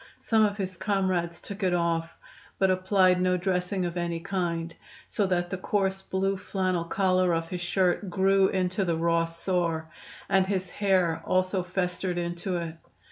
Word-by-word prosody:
Some 220 -1 +2
of 205 -1 +1
his 185 -3 -3
comrades 185 -4 0
took 200 +1 -8
it 185 -2 +2
off, 165 -1 -1 0.4
but 190 -1 +3
applied 185 -1 +3
no 180 0 +2
dressing 180 0 -1
of 175 0 -4
any 170 -1 -2
kind, 170 -2 -2 0.3
so 205 - 0
that 175 -1 0
the 190 - -3
coarse 195 -1 0
blue 190 +1 -1
flannel 185 -2 -1
collar 185 -1 +2
of 165 0 -3
his 180 -1 -4
shirt 180 +2 +1
grew 190 +1 +3
into 185 +1 0
the 170 -3 0
raw 165 0 +2
sore, 165 -1 -2 0.4
and 190 -1 +3
his 185 -2 -2
hair 185 -5 +1
also 185 +1 +1
festered 180 0 -2
into 175 +1 -2
it. 165 -1 -5
185 Hz, 165 wpm, -27 LUFS, 170-190 Hz, 0.4 s, but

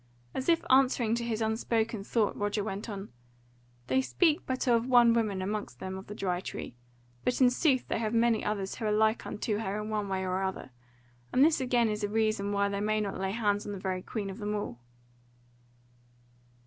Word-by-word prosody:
As 265 - -2
if 335 -1 +3
answering 255 -4 +4
to 235 0 -1
his 230 -1 -2
unspoken 220 -1 0
thought, 215 0 0
Roger 205 0 -1
went 205 +2 -5
on: 200 -1 -6 0.8
"They 130 +1 +2
speak 130 - +2
but 260 +1 -2
of 235 0 +3
one 240 -2 +6
woman 210 -5 0
amongst 200 -10 -4
them 190 0 -5
of 190 +1 -8
the 210 - -7
Dry 180 -3 -1
Tree, 150 - -7 0.5
but 250 - 0
in 250 -2 +6
sooth 260 -1 +2
they - - -1
have 220 -2 -1
many 230 -1 +2
others 200 -2 -2
who 225 - -5
are 210 - +1
like 220 +1 +2
unto 210 0 -2
her 210 -1 -2
in 210 +1 -5
one 210 -2 -1
way 190 0 -1
or 185 0 -1
other; 190 -8 -4 0.6
and 260 - +5
this 315 -3 +3
again 245 -2 +2
is 210 -1 -2
a 205 - 0
reason 215 -2 0
why 200 0 +2
they 200 0 -2
may 215 +1 +1
not 200 -3 -3
lay 190 0 -1
hands 205 -1 0
on 205 - -4
the - - -5
very 185 -1 -2
Queen 200 -1 -4
of 195 - -9
them 210 0 -2
all." 205 - -4
210 Hz, 210 wpm, -30 LUFS, 195-230 Hz, 0.8 s, one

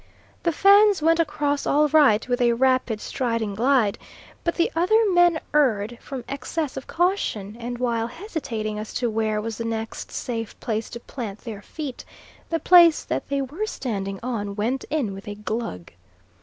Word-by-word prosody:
The 340 - +1
Fans 400 +1 +5
went 330 +1 +4
across 295 -2 0
all 300 +1 +4
right 275 -9 +4
with 245 0 0
a 240 -1 +4
rapid 255 -3 +1
striding 230 -4 -2
glide, 235 -1 +2 0.4
but 340 - 0
the 340 - +1
other 365 +7 +4
men 350 -2 +4
erred 240 -6 +2
from 265 -4 -6
excess 280 +2 -3
of 270 - -7
caution, 325 - -1
and 240 +1 -5
while 235 -2 0
hesitating 235 - -4
as 215 - -7
to 240 -2 0
where 215 -1 0
was 225 +1 -5
the - - -2
next 225 -1 -4
safe 225 -3 -5
place 220 -1 -3
to 235 - -7
plant 225 -5 -7
their 220 -4 -7
feet, 285 +2 -7 0.5
the 330 - 0
place 345 -3 +6
that - - -3
they 280 -1 0
were 320 +12 -4
standing 195 - -4
on 205 -5 -3
went 235 +6 -1
in 280 -10 -1
with 195 +1 -10
a 205 - -5
glug. 210 - -5
245 Hz, 170 wpm, -24 LUFS, 220-300 Hz, 0.5 s, place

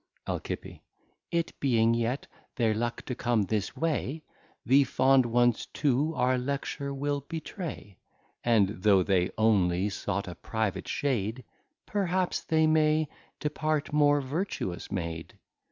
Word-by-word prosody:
Alci. - - -5 0.5
It 170 -1 -1
being 115 -4 +3
yet 120 +3 -1 0.3
their 115 -3 +2
luck 120 +2 -2
to 125 - -3
come 120 -3 +1
this 105 0 -2
way, 160 -1 -1 0.4
The 140 +2 +6
Fond 130 -1 +3
Ones 120 0 +2
to 145 +3 +1
our 130 0 +2
Lecture 140 +2 -3
we'll 140 +1 -1
betray: 155 - -7 0.4
And 105 -5 +2
though 100 -2 +5
they 90 -1 +2
only 100 -3 +3
sought 100 0 -3
a 90 - -5
private 110 +1 -3
shade, 125 -3 -1 0.4
Perhaps 185 -3 0
they 160 -1 +3
may 155 -1 +3 0.3
depart 150 0 -1
more 145 -1 +4
Vertuous 135 - -3
made. 85 -3 -4
130 Hz, 125 wpm, -29 LUFS, 110-150 Hz, 0.5 s, The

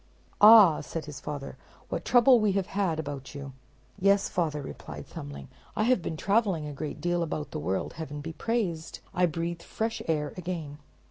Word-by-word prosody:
"Ah," 210 -6 +9
said 160 +2 -5
his 150 -2 -8
father, 145 -2 -6 0.3
"what - - -3
trouble 245 0 +6
we 210 -2 +2
have 195 -1 0
had 185 -6 -1
about 145 -2 -6
you." 140 -1 -7 0.5
"Yes, 200 +1 +3
father," 155 -4 -1
replied 140 - -8
Thumbling, 70 -1 -8 0.3
"I 215 - +1
have 245 -3 +3
been 160 -1 -4
traveling 195 -5 +1
a 150 - -5
great 150 +1 -5
deal 175 +2 0
about 155 -2 -3
the 155 - -4
world. 95 -9 -2
Heaven 150 -2 -6
be 160 +3 -6
praised! 185 -9 -2 0.2
I 180 -1 +3
breathe 170 +1 -3
fresh 225 +5 -3
air 150 -3 0
again." 165 -5 -5
165 Hz, 180 wpm, -28 LUFS, 150-195 Hz, 0.5 s, Ah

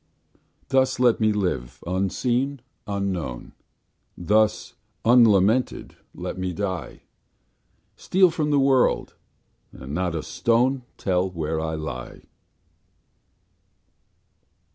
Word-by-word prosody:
Thus 130 -1 +2
let 125 -2 +4
me 110 -1 +3
live, 90 -13 -3
unseen, 120 +9 -1 0.3
unknown; 95 -11 -3 0.7
Thus 110 +5 +1 0.3
unlamented 115 0 +3 0.2
let - - -6
me 95 -1 -2
die; 95 -4 -5 0.9
Steal 185 -1 +3
from 155 -2 -1
the 145 - +3
world, 135 -2 +2 0.6
and 65 +2 -9
not 90 0 -1
a 80 - -3
stone 125 +3 +1 0.2
Tell 95 0 0
where 80 -3 -3
I 80 0 -3
lie. 75 -6 -7
100 Hz, 95 wpm, -24 LUFS, 85-125 Hz, 0.9 s, let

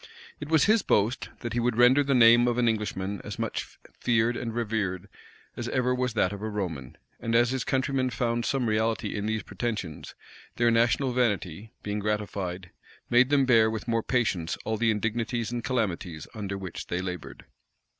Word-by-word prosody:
It 150 - -7
was 160 -2 +4
his 215 +1 +4
boast, 110 - +1
that 120 -2 -4
he 120 - 0
would 120 -1 0
render 125 +4 +6
the 140 -1 +1
name 120 0 +7
of 120 -1 0
an 120 -1 +2
Englishman 105 -3 -2
as - - -6
much - - -3 0.3
feared 120 0 +2
and 115 -1 -3
revered 105 -5 -2 0.5
as - - -4
ever 125 -1 +1
was 125 -2 -1
that 95 -2 +2
of 100 - -7
a 110 - -3
Roman; 85 - -5 0.2
and 115 0 -1
as 120 +1 +4
his 130 -1 -1
countrymen 130 -1 0
found 120 -1 -1
some 135 -1 0
reality 110 0 0
in 105 0 -3
these 110 0 -1
pretensions, 105 -10 -5 0.4
their 120 -1 +3
national 120 +3 +2
vanity, 105 -4 -1
being 105 0 -2
gratified, 100 -4 -3 0.4
made 120 +2 +5
them 140 -2 +4
bear 115 -3 +5
with 110 +1 -5
more 115 -1 +1
patience 105 -10 0
all 110 - 0
the 115 +1 +1
indignities 115 +2 -1
and 120 -1 -3
calamities 95 -10 -2
under 100 -3 -4
which 95 -3 -7
they 90 - -2
labored. 90 -2 -6
115 Hz, 185 wpm, -27 LUFS, 105-120 Hz, 0.5 s, name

